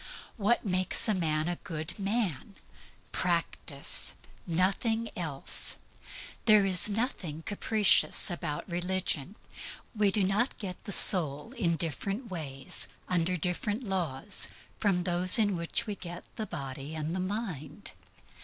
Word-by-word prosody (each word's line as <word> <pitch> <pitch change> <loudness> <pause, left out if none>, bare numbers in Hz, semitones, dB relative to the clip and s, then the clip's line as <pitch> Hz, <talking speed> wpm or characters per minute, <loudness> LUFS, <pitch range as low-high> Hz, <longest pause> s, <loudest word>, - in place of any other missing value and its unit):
What 230 +2 0
makes 185 +2 +1
a 215 - +2
man 155 -4 -1
a 175 0 -2
good 170 -1 -6
man? 200 - -2 0.6
Practice. 170 -3 0 0.3
Nothing 205 +6 0
else. 155 -6 0 0.7
There 215 -3 +6
is 190 +1 +4
nothing 200 - -3
capricious 210 -1 +4
about 170 -4 -4
religion. 180 -1 -2 0.6
We 210 -1 +3
do 205 0 +1
not 205 +7 0
get 185 -4 -8
the 205 - -5
soul 160 -2 +7
in 180 -10 0
different 195 - -4
ways, 140 -6 -2 0.2
under 180 0 0
different 205 - -2
laws, 185 - +1 0.3
from 190 -4 +1
those 180 0 0
in 205 -4 +2
which 170 +6 -2
we 210 - -4
get 175 -3 -8
the 220 -2 -4
body 140 -1 -6
and 155 +2 -3
the - - -2
mind. 185 - -5
185 Hz, 125 wpm, -29 LUFS, 165-205 Hz, 0.7 s, soul